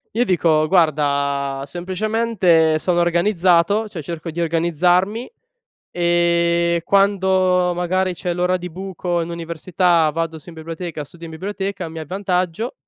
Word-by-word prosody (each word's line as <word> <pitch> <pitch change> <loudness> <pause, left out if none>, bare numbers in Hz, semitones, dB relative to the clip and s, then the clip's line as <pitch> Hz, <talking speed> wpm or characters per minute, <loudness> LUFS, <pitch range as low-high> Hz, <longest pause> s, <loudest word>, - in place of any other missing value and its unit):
io 240 +2 +2
dico: 160 -5 +2
"Guarda, 140 -5 +1
semplicemente 180 -1 +1
sono 175 +1 0
organizzato 175 +3 +2
cioè 195 -6 -7
cerco 165 +2 -6
di 170 +2 -4
organizzarmi, 175 - +1 0.6
e 170 0 +1
quando 190 -2 +2
magari 185 +1 0
c'è 175 0 -3
l'ora 180 +1 +1
di 180 0 -7
buco 180 -1 -3
in 165 - -5
università, 170 0 +1
vado 165 +1 -3
su 170 +4 -13
in 165 - -12
biblioteca, 160 -1 -6
studio 165 +3 -12
in - - -10
biblioteca, 195 +1 -4
mi 160 0 -8
avvantaggio" 185 - -2
175 Hz, 130 wpm, -20 LUFS, 165-185 Hz, 0.6 s, io